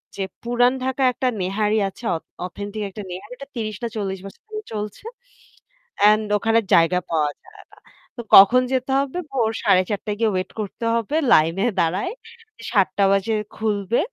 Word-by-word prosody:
যে 195 Hz, -, -5 dB, 0.2 s
পুরান 245 Hz, +1 st, +2 dB
ঢাকায় 265 Hz, 0 st, +1 dB
একটা 255 Hz, -, -1 dB
নেহারি 210 Hz, +3 st, 0 dB
আছে 195 Hz, +5 st, -11 dB
অথ 160 Hz, -, -6 dB, 0.2 s
অথেন্টিক 205 Hz, +3 st, -6 dB
একটা 205 Hz, +2 st, -8 dB
নেহারিটা 250 Hz, +9 st, -8 dB
৩০ 215 Hz, -3 st, -4 dB
না 235 Hz, -, 0 dB
৪০ 195 Hz, -3 st, -3 dB
বছর 195 Hz, -, -12 dB
ধরে 430 Hz, 0 st, -5 dB
চলছে। 210 Hz, -, -5 dB, 1.0 s
অ্যান্ড 215 Hz, +1 st, +5 dB
ওখানে 225 Hz, +2 st, +2 dB, 0.2 s
জায়গা 170 Hz, +2 st, +4 dB
পাওয়া 150 Hz, -3 st, +1 dB
যায় 410 Hz, 0 st, -16 dB
না। -, -, -19 dB, 0.4 s
তো -, -, -6 dB
কখন 215 Hz, +6 st, +9 dB
যেতে 260 Hz, 0 st, -1 dB
হবে? 280 Hz, +5 st, -3 dB
ভোর 235 Hz, -5 st, +1 dB
৪:৩০ 195 Hz, +3 st, +1 dB
য় -, -, -4 dB
গিয়ে 225 Hz, -2 st, +3 dB
ওয়েট 185 Hz, 0 st, -2 dB
করতে 210 Hz, +3 st, -6 dB
হবে 230 Hz, +5 st, -2 dB, 0.2 s
লাইনে 165 Hz, +5 st, +4 dB, 0.2 s
দাঁড়ায়ে। 185 Hz, -, 0 dB, 0.6 s
৭ঃ০০ 195 Hz, -1 st, +2 dB
বাজে 195 Hz, +3 st, +1 dB, 0.2 s
খুলবে। 215 Hz, 0 st, -1 dB
210 Hz, 160 wpm, -22 LUFS, 195-240 Hz, 1.0 s, কখন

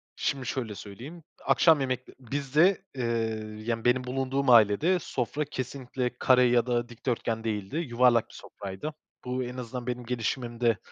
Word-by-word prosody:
Şimdi 135 Hz, -3 st, -2 dB
şöyle 115 Hz, -4 st, -3 dB
söyleyeyim, 125 Hz, -, -10 dB, 0.2 s
akşam 160 Hz, -3 st, +5 dB
yemekte 130 Hz, -1 st, -3 dB
bizde, 145 Hz, -, +2 dB
eee, 125 Hz, -, -3 dB, 0.6 s
yani, 115 Hz, -1 st, -2 dB
benim 125 Hz, +1 st, +3 dB
bulunduğum 135 Hz, +1 st, -1 dB
ailede 120 Hz, -, +5 dB
sofra 145 Hz, +2 st, -2 dB
kesinlikle 130 Hz, -2 st, -4 dB
kare 125 Hz, -1 st, +5 dB
ya 120 Hz, -1 st, +4 dB
da 120 Hz, -1 st, 0 dB
dikdörtgen 115 Hz, -1 st, -2 dB
değildi. 105 Hz, +5 st, -3 dB
Yuvarlak 125 Hz, -6 st, +3 dB
bir -, -, -16 dB
sofraydı. 100 Hz, +10 st, -7 dB, 0.3 s
Bu, 125 Hz, +1 st, -1 dB
en 125 Hz, +1 st, -6 dB
azından 125 Hz, 0 st, -6 dB
benim 125 Hz, -1 st, -3 dB
gelişimimde 120 Hz, -1 st, -1 dB
125 Hz, 145 wpm, -28 LUFS, 115-135 Hz, 0.6 s, akşam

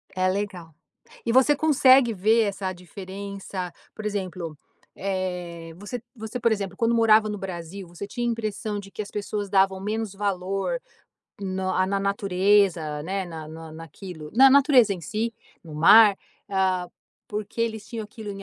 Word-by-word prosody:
É 185 Hz, 0 st, +2 dB
legal. 185 Hz, -4 st, -3 dB, 0.5 s
E 230 Hz, -, 0 dB
você 265 Hz, +3 st, +5 dB
consegue 270 Hz, -5 st, +5 dB
ver 220 Hz, +3 st, +3 dB
essa 195 Hz, -2 st, -2 dB
diferença, 190 Hz, 0 st, -7 dB, 0.2 s
por 215 Hz, -, -8 dB
exemplo, 185 Hz, -6 st, -4 dB, 0.4 s
eh, 180 Hz, -3 st, -4 dB
você 210 Hz, +5 st, -6 dB
você, 220 Hz, 0 st, -6 dB
por 235 Hz, -1 st, +2 dB
exemplo, 195 Hz, -3 st, -3 dB
quando 230 Hz, 0 st, +2 dB
morava 220 Hz, -1 st, +5 dB
no 210 Hz, -1 st, -4 dB
Brasil, 185 Hz, 0 st, -7 dB
você 175 Hz, +4 st, -7 dB
tinha 240 Hz, +3 st, -3 dB
a -, -, +2 dB
impressão 215 Hz, -2 st, -3 dB
de 195 Hz, -1 st, -9 dB
que -, -, -8 dB
as 205 Hz, -, -10 dB
pessoas 205 Hz, 0 st, -3 dB
davam 190 Hz, -1 st, +3 dB
menos 215 Hz, +1 st, -3 dB
valor 195 Hz, -, -2 dB, 0.6 s
no 190 Hz, -1 st, -2 dB
ah, 185 Hz, 0 st, +2 dB
na 195 Hz, +1 st, 0 dB
natureza, 195 Hz, -5 st, +2 dB
né, 190 Hz, +4 st, -2 dB
na 160 Hz, -2 st, -7 dB
na 160 Hz, 0 st, -9 dB
naquilo 165 Hz, 0 st, -9 dB
na 265 Hz, +3 st, +8 dB
natureza 265 Hz, -6 st, +6 dB
em 180 Hz, -, -8 dB
si, 220 Hz, +8 st, -2 dB, 0.3 s
no 160 Hz, -3 st, -10 dB
mar, 205 Hz, +6 st, +7 dB, 0.3 s
ah, 185 Hz, -2 st, +1 dB, 0.4 s
porque 210 Hz, +2 st, -5 dB
eles 220 Hz, -2 st, -2 dB
tinham 230 Hz, -2 st, -5 dB
aquilo 210 Hz, 0 st, -8 dB
em 195 Hz, 0 st, -7 dB
200 Hz, 165 wpm, -25 LUFS, 185-220 Hz, 0.6 s, na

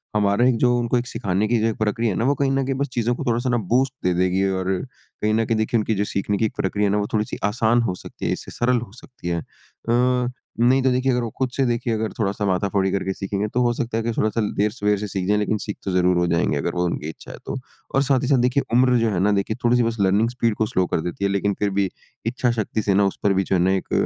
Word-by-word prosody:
हमारा 105 Hz, +3 st, +3 dB
एक 130 Hz, -, +3 dB
जो 120 Hz, +1 st, +3 dB
उनको 120 Hz, +1 st, +1 dB
एक 120 Hz, +1 st, -2 dB
सिखाने 100 Hz, 0 st, -1 dB
की 120 Hz, +2 st, +2 dB
जो 110 Hz, -, +1 dB
ये 115 Hz, -, 0 dB
प्रक्रिया 110 Hz, +1 st, 0 dB
है -, -, -3 dB
ना, 115 Hz, -, 0 dB
वो 140 Hz, -, +3 dB
कहीं 140 Hz, -1 st, +1 dB
न 135 Hz, 0 st, +1 dB
कहीं 135 Hz, 0 st, -1 dB
बस 140 Hz, +2 st, -1 dB
चीज़ों 120 Hz, 0 st, +1 dB
को -, -, -5 dB
थोड़ा-सा 120 Hz, +2 st, 0 dB
ना, 125 Hz, -, +2 dB
बूस्ट 120 Hz, +5 st, +1 dB
दे 90 Hz, -, +2 dB
देगी 95 Hz, +2 st, +1 dB
और 95 Hz, -1 st, -2 dB, 0.5 s
कहीं 105 Hz, 0 st, +1 dB
न 115 Hz, +1 st, +2 dB
कहीं 115 Hz, 0 st, 0 dB
देखिए, 110 Hz, +2 st, +1 dB
उनकी 110 Hz, 0 st, 0 dB
जो 100 Hz, -, +1 dB
सीखने 100 Hz, 0 st, -1 dB
की 110 Hz, -, +2 dB
प्रक्रिया 105 Hz, +2 st, 0 dB
है -, -, +1 dB
ना, 105 Hz, -, +2 dB
वो 105 Hz, 0 st, -1 dB
थोड़ी-सी 110 Hz, -1 st, -1 dB
आसान 115 Hz, +3 st, +2 dB
हो 105 Hz, -6 st, -1 dB
सकती -, -, -9 dB
है, -, -, +1 dB
इससे -, -, -5 dB
सरल 125 Hz, +1 st, +1 dB
हो 120 Hz, -, -9 dB
सकती 120 Hz, -3 st, -11 dB
है। 85 Hz, -1 st, 0 dB
अ, -, -, -6 dB, 1.2 s
नहीं, 130 Hz, +3 st, +4 dB
तो 130 Hz, -, +3 dB
देखिए, 130 Hz, +1 st, +1 dB
अगर 125 Hz, 0 st, +1 dB
वो 115 Hz, -, -3 dB
खुद 130 Hz, -1 st, 0 dB
से 135 Hz, -, +2 dB
देखिए, 120 Hz, -1 st, 0 dB
अगर 110 Hz, -1 st, -1 dB
थोड़ा-सा 100 Hz, 0 st, -1 dB
माथा-फोड़ी 95 Hz, 0 st, +1 dB
करके 95 Hz, 0 st, -1 dB
सीखेंगे, 100 Hz, +2 st, -2 dB
तो 125 Hz, +4 st, -1 dB
हो 120 Hz, -1 st, +2 dB
सकता 120 Hz, -2 st, -2 dB
है 115 Hz, -, -1 dB
कि 115 Hz, -, -1 dB
थोड़ा-सा 110 Hz, +1 st, +1 dB, 0.2 s
देर-सवेर 105 Hz, 0 st, +1 dB
से 105 Hz, -, -3 dB
सीख 95 Hz, -2 st, -3 dB
जाएँ, 105 Hz, +1 st, +3 dB
लेकिन 105 Hz, +1 st, 0 dB
सीख 105 Hz, -, -5 dB
तो 95 Hz, -, -1 dB
ज़रूर 90 Hz, 0 st, +3 dB
हो 90 Hz, -, +2 dB
जाएँगे, 85 Hz, -3 st, +1 dB
अगर 85 Hz, +5 st, -2 dB
वो 90 Hz, 0 st, +1 dB
उनकी 80 Hz, -3 st, -3 dB
इच्छा 80 Hz, -, -10 dB
है -, -, -9 dB
तो। -, -, -3 dB, 0.4 s
और 135 Hz, -, +4 dB
साथ 135 Hz, -2 st, +2 dB
ही -, -, -1 dB
साथ, 140 Hz, -1 st, +4 dB
देखिए, 125 Hz, +3 st, +2 dB
उम्र 125 Hz, 0 st, +4 dB
जो 115 Hz, -1 st, +2 dB
है 90 Hz, -, -1 dB
ना, 105 Hz, +3 st, +3 dB
देखिए 100 Hz, +2 st, 0 dB
थोड़ी-सी 120 Hz, 0 st, +4 dB
बस 115 Hz, 0 st, -1 dB
लर्निंग 100 Hz, +4 st, +3 dB
स्पीड 115 Hz, -3 st, 0 dB
को 110 Hz, -, +1 dB
स्लो 95 Hz, -3 st, 0 dB
कर -, -, 0 dB
देती 90 Hz, +4 st, -5 dB
है, -, -, +2 dB
लेकिन 100 Hz, +1 st, +1 dB
फिर 105 Hz, -, +1 dB
भी 95 Hz, -2 st, +1 dB, 0.4 s
इच्छा 125 Hz, +1 st, 0 dB
शक्ति 110 Hz, -1 st, -2 dB
से 100 Hz, -1 st, +1 dB
ना, 100 Hz, +1 st, +4 dB
उस 100 Hz, -, -1 dB
पर 100 Hz, -, +3 dB
भी 95 Hz, 0 st, +1 dB
जो 95 Hz, -, 0 dB
है 90 Hz, -, +2 dB
ना, 95 Hz, +2 st, +3 dB
एक 95 Hz, -1 st, -2 dB
110 Hz, 290 wpm, -22 LUFS, 100-120 Hz, 1.2 s, नहीं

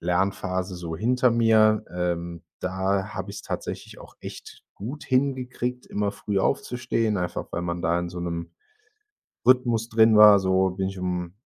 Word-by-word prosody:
Lernphase 95 Hz, +1 st, -1 dB
so 85 Hz, -2 st, -5 dB
hinter 125 Hz, +5 st, +2 dB
mir. 110 Hz, -2 st, +4 dB
Ähm, 85 Hz, -1 st, -3 dB, 0.2 s
da 95 Hz, +1 st, -1 dB
habe -, -, -5 dB
ich's -, -, -8 dB
tatsächlich -, -, -6 dB
auch -, -, -14 dB
echt -, -, -10 dB
gut 135 Hz, +10 st, -7 dB
hingekriegt, 125 Hz, -2 st, -1 dB
immer 105 Hz, 0 st, -2 dB
früh 100 Hz, -1 st, -2 dB
aufzustehen, 115 Hz, +1 st, 0 dB
einfach 90 Hz, -2 st, -3 dB
weil 85 Hz, -, -2 dB
man 85 Hz, 0 st, -3 dB
da 85 Hz, +2 st, +1 dB
in 85 Hz, 0 st, -3 dB
so 90 Hz, 0 st, -7 dB
'nem 85 Hz, -1 st, -4 dB, 0.9 s
Rhythmus 120 Hz, -3 st, +3 dB
drin 110 Hz, 0 st, +5 dB
war. 105 Hz, -1 st, +9 dB
So 95 Hz, 0 st, +2 dB
bin 95 Hz, +1 st, -2 dB
ich 95 Hz, 0 st, -7 dB
um 90 Hz, -1 st, -3 dB
95 Hz, 155 wpm, -25 LUFS, 90-115 Hz, 0.9 s, war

